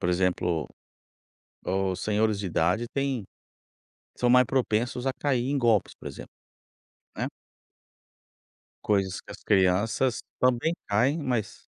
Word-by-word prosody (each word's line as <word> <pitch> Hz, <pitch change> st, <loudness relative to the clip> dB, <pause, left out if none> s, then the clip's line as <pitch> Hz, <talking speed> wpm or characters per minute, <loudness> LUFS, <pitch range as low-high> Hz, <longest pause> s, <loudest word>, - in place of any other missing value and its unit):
Por -, -, 0 dB
exemplo, 90 Hz, -3 st, 0 dB, 1.0 s
os 95 Hz, 0 st, -1 dB
senhores 105 Hz, 0 st, +1 dB
de 100 Hz, -, -3 dB
idade 90 Hz, +7 st, +1 dB
têm 135 Hz, -6 st, -1 dB, 0.9 s
são 125 Hz, -, +2 dB
mais 125 Hz, 0 st, +6 dB
propensos 125 Hz, -1 st, 0 dB
a 135 Hz, -, +3 dB
cair 130 Hz, -2 st, 0 dB
em 145 Hz, -, +1 dB
golpes, 115 Hz, -6 st, +2 dB
por -, -, -11 dB
exemplo, -, -, -10 dB, 0.9 s
né. -, -, -1 dB, 1.6 s
Coisas 95 Hz, -3 st, 0 dB
que -, -, -15 dB
as -, -, -12 dB
crianças 105 Hz, +5 st, +2 dB, 0.2 s
também 130 Hz, +6 st, +2 dB
caem, 125 Hz, +10 st, +2 dB
mas 120 Hz, -6 st, -2 dB
110 Hz, 120 wpm, -27 LUFS, 95-125 Hz, 1.6 s, mais